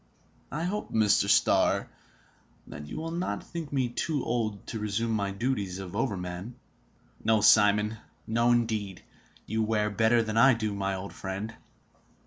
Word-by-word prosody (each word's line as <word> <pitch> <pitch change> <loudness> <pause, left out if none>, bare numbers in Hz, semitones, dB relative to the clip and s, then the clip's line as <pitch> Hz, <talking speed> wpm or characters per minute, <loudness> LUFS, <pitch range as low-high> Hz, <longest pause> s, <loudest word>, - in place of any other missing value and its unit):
I 150 +4 -3
hope, 200 +4 -3
Mr. 105 -2 +3
Starr, - - +3 0.8
that 75 0 -9
you - - -7
will 165 +1 -4
not 175 +2 -3
think 165 -3 -7
me 130 -3 +1
too 145 +3 -2
old 110 -4 -2
to 115 - -4
resume 105 +2 -1
my 100 -3 0
duties 100 -3 -2
of 95 0 -7
overman?" 100 -2 -3 0.7
"No, 110 -1 +3
Simon, 105 +1 +5 0.3
no 115 +2 +2
indeed! 110 -5 -1 0.4
You 110 +1 -1
wear 105 -1 +1
better 115 +2 +3
than 110 0 -3
I 130 +2 +7
do, 110 -2 -2
my 95 -1 -2
old 95 +1 -7
friend!" 100 +4 -5
110 Hz, 150 wpm, -28 LUFS, 100-120 Hz, 0.8 s, I